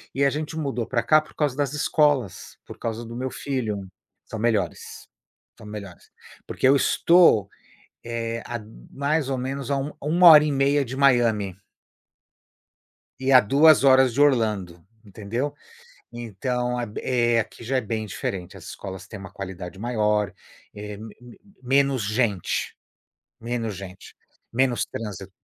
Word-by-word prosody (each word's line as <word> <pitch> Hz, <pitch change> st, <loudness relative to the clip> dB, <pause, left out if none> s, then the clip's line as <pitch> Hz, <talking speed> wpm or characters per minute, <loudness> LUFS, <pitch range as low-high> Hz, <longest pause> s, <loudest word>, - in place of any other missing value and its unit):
E 140 Hz, -, +1 dB
a -, -, +4 dB
gente 150 Hz, +2 st, -4 dB
mudou 135 Hz, -6 st, -2 dB
pra 120 Hz, -2 st, 0 dB
cá 155 Hz, +6 st, +5 dB
por 155 Hz, -, -18 dB
causa 145 Hz, -4 st, 0 dB
das 145 Hz, -1 st, -1 dB
escolas, 145 Hz, -, 0 dB
por -, -, -11 dB
causa 115 Hz, 0 st, -4 dB
do 115 Hz, +1 st, -9 dB
meu 130 Hz, +2 st, -3 dB
filho 110 Hz, -8 st, -3 dB, 0.4 s
são 110 Hz, -, -7 dB
melhores, 110 Hz, -2 st, -2 dB, 0.5 s
são 110 Hz, -, -13 dB
melhores. 100 Hz, -4 st, -10 dB, 0.4 s
Porque -, -, 0 dB
eu 135 Hz, -, +6 dB
estou, 140 Hz, -, +4 dB, 0.5 s
eh, 115 Hz, 0 st, -4 dB
há 120 Hz, -1 st, -4 dB, 0.3 s
mais 140 Hz, +1 st, -1 dB
ou 135 Hz, -, -1 dB
menos 135 Hz, +1 st, -4 dB
há 140 Hz, -, +1 dB
um 135 Hz, +2 st, -3 dB
1 170 Hz, +5 st, +4 dB
hora 150 Hz, -2 st, +9 dB
e 150 Hz, -, 0 dB
meia 140 Hz, +1 st, +2 dB
de 130 Hz, +2 st, -6 dB
Miami 115 Hz, -8 st, +2 dB, 1.6 s
e 135 Hz, +1 st, +1 dB
a 130 Hz, -, +9 dB
2 140 Hz, +7 st, +5 dB
horas 130 Hz, -2 st, +5 dB
de 140 Hz, -, -1 dB
Orlando, 105 Hz, -, +1 dB, 0.2 s
entendeu. 110 Hz, +7 st, -4 dB, 0.6 s
Então, 125 Hz, +2 st, -3 dB
é 120 Hz, -, -2 dB
b 105 Hz, -, -7 dB
é 120 Hz, -2 st, +2 dB
aqui 115 Hz, -, -5 dB
já 130 Hz, +3 st, 0 dB
é -, -, +1 dB
bem 110 Hz, -1 st, -3 dB
diferente. 95 Hz, -2 st, -5 dB
As 85 Hz, -, -13 dB
escolas 95 Hz, 0 st, -8 dB
têm 105 Hz, -, -9 dB
uma 95 Hz, -1 st, -10 dB
qualidade 95 Hz, -1 st, -8 dB
maior, 105 Hz, -2 st, 0 dB, 0.4 s
eh, 105 Hz, 0 st, -7 dB
m 110 Hz, +1 st, -11 dB
m 125 Hz, -1 st, -15 dB, 0.2 s
menos 135 Hz, -1 st, +2 dB
gente, 105 Hz, -3 st, -1 dB, 0.7 s
menos 115 Hz, -2 st, -3 dB
gente, 95 Hz, 0 st, -11 dB, 0.4 s
menos 125 Hz, 0 st, +1 dB
trânsi 100 Hz, -3 st, -7 dB
120 Hz, 155 wpm, -24 LUFS, 105-135 Hz, 1.6 s, hora